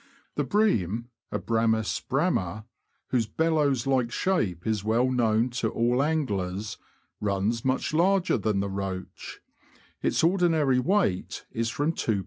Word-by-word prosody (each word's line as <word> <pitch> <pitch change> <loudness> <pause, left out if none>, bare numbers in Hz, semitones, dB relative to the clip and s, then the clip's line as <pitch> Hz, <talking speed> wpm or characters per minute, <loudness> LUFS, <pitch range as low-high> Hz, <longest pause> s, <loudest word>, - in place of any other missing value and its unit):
The - - 0
Bream 120 - +1 0.2
[Abramts 110 +1 0
bramd), 100 +5 0 0.4
whose 120 -4 +1
bellows 145 -1 +1
like 130 -3 +1
shape 105 - 0
is 110 -3 0
well 115 +4 +2
known 115 -1 +2
to 110 - +1
all 120 +4 +1
anglers, 105 - -1 0.4
runs 105 +3 0
much 130 +3 0
larger 185 +3 +3
than 105 -3 0
the 100 - -2
roach; 95 -1 -6 0.6
its - - +1
ordinary 165 -7 +3
weight 165 - 0
is 115 0 -1
from 145 +7 0
2lb. 110 -9 0
115 Hz, 125 wpm, -27 LUFS, 105-150 Hz, 0.6 s, larger